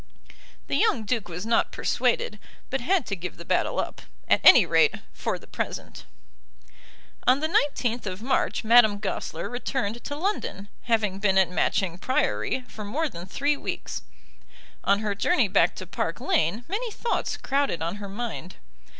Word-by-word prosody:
The - - 0
young 435 - +2
Duke 225 -1 -1
was 175 +3 -6
not 230 0 +2
persuaded, 485 0 0 0.3
but 270 - -1
had 350 +2 +2
to 195 - -2
give 180 -1 -6
the 170 - -10
battle - - +1
up, - - -3 0.3
at - - +4
any - - +9
rate, 450 - +4 0.2
for - - -2
the - - -16
present. - - -5 1.2
On 255 +2 +5
the 310 - 0
19th 250 -7 0
of 190 +3 -5
March 265 - 0
Madame 220 -2 +6
Goesler 190 -5 -4
returned 240 -2 -3
to 285 - -3
London, 305 - -3 0.2
having 215 -5 +1
been 195 -2 +2
at 190 -2 +4
Matching 180 0 0
Priory 145 - 0
for 215 - -8
more 290 +11 -1
than 175 -5 -9
three 285 +9 +1
weeks. - - -5 0.8
On 200 +1 +3
her 210 -2 -1
journey 240 - +2
back 180 -3 +3
to 185 - -7
Park 165 -2 -3
Lane 190 +10 0
many 450 +6 -2
thoughts 465 +2 -2
crowded 275 - 0
on 170 +5 -2
her 200 -1 -7
mind. 210 -4 -5
220 Hz, 165 wpm, -26 LUFS, 190-270 Hz, 1.2 s, any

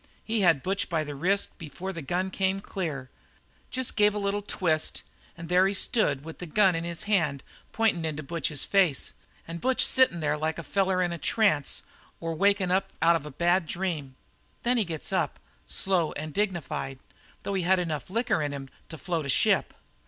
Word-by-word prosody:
He 225 -1 0
had 165 -7 +4
Butch 195 +2 -1
by 165 -3 0
the 145 -1 -6
wrist 185 +10 0
before 175 +4 -6
the 165 - -5
gun 180 +7 -1
came 190 0 0
clear 155 -10 -4 0.6
just 260 -1 -1
gave 210 -1 +4
a - - -1
little 200 0 -1
twist 160 -6 -1 0.3
and 165 0 -7
there 180 +2 +4
he 200 - -1
stood 150 - +1
with 160 - -9
the 180 - -6
gun 190 +3 +4
in 165 0 -2
his 170 -1 -3
hand 165 -10 +1 0.3
pointin' 220 -7 +1
into 155 -1 -3
Butch's 150 -2 -1
face, 185 -9 +2 0.3
and 170 +1 -6
Butch 260 0 +3
sittin' 260 -10 +4
there 150 -1 0
like 155 +1 -1
a 170 - -5
feller 190 +2 +1
in 175 - 0
a 170 - -4
trance 175 - +2 0.4
or 165 0 -3
wakin' 195 +1 +2
up 190 +1 +1
out 170 +1 +5
of 150 -2 -3
a - - -8
bad 175 +4 +2
dream. 160 -8 -3 0.5
"Then 245 +1 +2
he 220 - +2
gets 160 -3 -3
up, - - 0 0.3
slow 180 -5 0
and 155 +1 -6
dignified, 175 -9 -2 0.5
though 200 - -3
he 190 - 0
had 185 +2 +3
enough 165 -2 -3
liquor 225 -5 +1
in 145 -1 -2
him 135 -1 -7 0.2
to 160 - -7
float 165 -3 -2
a - - -5
ship. - - +3
175 Hz, 195 wpm, -27 LUFS, 155-195 Hz, 0.6 s, out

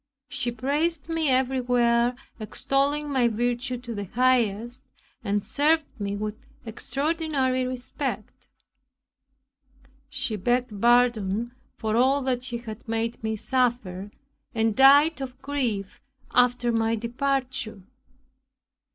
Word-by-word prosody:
She 240 - -1
praised 290 +7 -1
me 325 -3 +1
everywhere, 245 -2 +2 0.2
extolling 275 +7 0
my 255 -3 +3
virtue 240 +3 -1
to 240 -1 -7
the 205 -2 -4
highest 240 0 +1 0.4
and 205 0 0
served 310 +2 +2
me 200 0 -2
with 210 +2 -5 0.2
extraordinary 275 +1 -1
respect. 255 -1 -5 1.6
She 265 -5 -2
begged 240 0 -1
pardon 235 -2 +3 0.2
for 220 -1 -2
all 265 +3 +3
that 255 -2 0
she 245 -1 -4
had 230 -1 -9
made 225 0 -2
me 220 0 -1
suffer, 215 -6 -1 0.5
and 225 -1 +1
died 285 +3 +6
of 255 -1 -6
grief 245 -9 -2 0.3
after 245 -1 +3
my 225 0 +1
departure. 250 -2 -2
245 Hz, 110 wpm, -26 LUFS, 225-265 Hz, 1.6 s, died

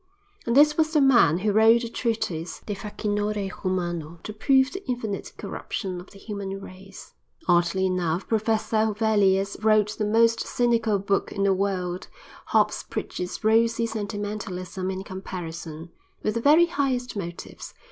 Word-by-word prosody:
And 235 +3 +2
this 300 +1 +6
was 315 0 +2
the 305 - +4
man 240 - +5
who 205 +3 0
wrote 225 +3 +5
the - - -3
treatise 215 -8 -3
"De 210 - -3
Facinore 205 -1 -2
Humano"; 175 -4 -2
to 215 - -6
prove 265 +5 +3
the 385 +1 -7
infinite 220 -5 -3
corruption 185 -4 -5
of 180 - -15
the - - -15
human 195 -2 -5
race. 195 0 -12 0.3
Oddly 175 +1 +3
enough, 180 -1 -1
Professor 220 0 0
Huvelius 205 -3 +2
wrote 215 -1 +4
the 210 - +1
most 230 +2 +3
cynical 230 -3 +1
book 195 0 -1
in 200 - -2
the 195 -1 +4
world—Hobbes 185 -2 -2
preaches 180 +4 -5
rosy 230 +1 +3
sentimentalism 205 -4 -4
in 190 0 -4
comparison—with 180 - -7
the 230 - -2
very 305 +6 +6
highest 270 -8 -1
motives. 175 -4 -7
205 Hz, 140 wpm, -25 LUFS, 185-230 Hz, 0.3 s, this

